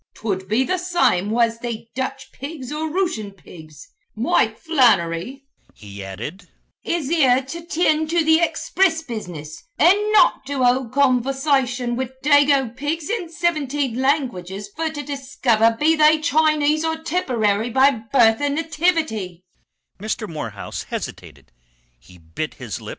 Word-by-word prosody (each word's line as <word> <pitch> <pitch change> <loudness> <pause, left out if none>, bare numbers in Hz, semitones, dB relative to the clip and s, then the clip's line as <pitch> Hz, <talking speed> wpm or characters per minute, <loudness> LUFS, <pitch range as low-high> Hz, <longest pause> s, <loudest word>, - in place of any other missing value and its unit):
'Twould 190 -4 -4
be 220 +6 +2
the 370 +6 -1
same 345 - +1
was 230 0 +1
they 235 -2 -6
Dutch 265 +1 -5
pigs 275 -1 -8
or 310 +1 -3
Rooshun 230 - -2
pigs. 155 -4 -14 0.3
Mike 220 0 +1
Flannery," 245 - +1 0.3
he 100 -1 -10
added, 120 - -8 0.3
"is 335 -5 -2
here 265 -6 +3
to 335 +6 -8
tind 315 -2 +1
to 335 -1 +1
the 320 0 +5
expriss 340 0 +1
business 175 - -7 0.2
and 360 - +6 0.2
not 430 - +4
to 275 -2 -1
hould 245 -1 +1
conversation 260 -2 +1
wid 260 +1 -4
dago 280 -4 +3
pigs 295 - -3
in 395 -8 -3
sivinteen 290 -7 -1
languages 205 - -1
fer 325 0 -1
to 295 -2 -6
discover 255 -5 +1
be 320 +2 +4
they 310 0 +5
Chinese 310 -1 +2
or 320 0 -1
Tipperary 240 - 0
by 265 +3 +4 0.2
birth 225 -3 +4
an' 285 0 0
nativity." 310 - -1
270 Hz, 120 wpm, -21 LUFS, 225-315 Hz, 0.3 s, and